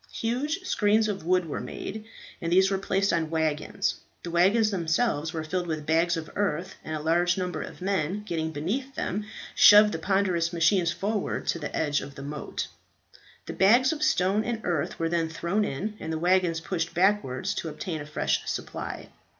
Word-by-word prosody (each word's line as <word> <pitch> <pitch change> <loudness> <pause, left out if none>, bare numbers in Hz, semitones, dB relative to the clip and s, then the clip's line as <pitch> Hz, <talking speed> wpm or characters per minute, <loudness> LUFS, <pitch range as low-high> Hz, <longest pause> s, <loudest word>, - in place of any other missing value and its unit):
Huge 275 +10 -2
screens 215 - +2
of 195 -5 -4
wood 180 -1 +3
were 155 - -4
made, 215 +2 -6 0.4
and 165 - -2
these 190 +2 +5
were 195 - +1
placed 195 +1 +1
on 165 -2 0
waggons; 155 -2 -1 0.3
the 170 - -5
waggons 200 +6 +4
themselves 165 -2 0
were 160 -1 -4
filled 175 +2 -2
with 155 -2 -3
bags 165 +2 +2
of 160 -1 -6
earth, 185 -3 -1
and 155 - -4
a - - -3
large 175 +3 +2
number 180 -1 -2
of - - -9
men 195 +1 -1
getting 165 -5 -2
beneath 230 - -3
them 210 +3 -3 0.3
shoved 210 0 +8
the 165 - -3
ponderous 185 -2 +1
machines 170 +1 +3
forward 205 +2 -2
to 170 - -1
the 150 - -5
edge 145 -2 +1
of 140 0 -9
the 140 - -8
moat. 145 +1 -4 0.8
The - - -5
bags 240 +9 +5
of 305 - -7
stones 210 - +2
and 235 -2 -2
earth 170 -5 -1
were 165 - 0
then 165 -1 0
thrown 170 +6 -1
in, 205 +5 -3
and 160 - -5
the 160 - -1
waggons 175 -1 +2
pushed 170 -1 -3
backwards 190 -3 +1
to 175 -5 -4
obtain 155 +1 -5
a - - -7
fresh 150 - 0
supply. - - -5
175 Hz, 190 wpm, -27 LUFS, 160-205 Hz, 0.8 s, shoved